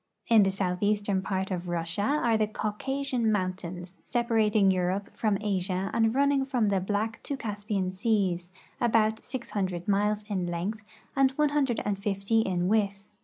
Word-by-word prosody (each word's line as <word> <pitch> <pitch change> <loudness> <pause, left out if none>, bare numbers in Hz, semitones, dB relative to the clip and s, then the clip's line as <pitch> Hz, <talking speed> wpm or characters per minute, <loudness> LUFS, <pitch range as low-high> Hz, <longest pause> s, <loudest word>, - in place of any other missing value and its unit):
In 225 -2 +7
the 195 - +4
southeastern 195 +1 0
part 190 0 -2
of 180 -1 -3
Russia 170 +2 -2
are 240 -1 +2
the 215 -1 +2
Caucasian 235 +3 -1
mountains, 185 -2 -3
separating 220 -4 +2
Europe 185 +2 -1
from 215 -3 +1
Asia 195 -2 -1
and 225 +1 +2
running 280 0 +3
from 250 -6 +1
the 195 -2 +1
Black 210 +4 -2
to 285 - -3
the - - -11
Caspian 205 -3 -2
seas, 185 -3 0 0.3
about 220 -2 +2
600 195 -9 -4
miles 210 +1 +1
in 190 -4 -1
length 180 +6 -3 0.3
and 270 -1 +5
150 225 -8 +1
in 180 -4 0
width. 200 -1 0
205 Hz, 145 wpm, -28 LUFS, 190-225 Hz, 0.3 s, In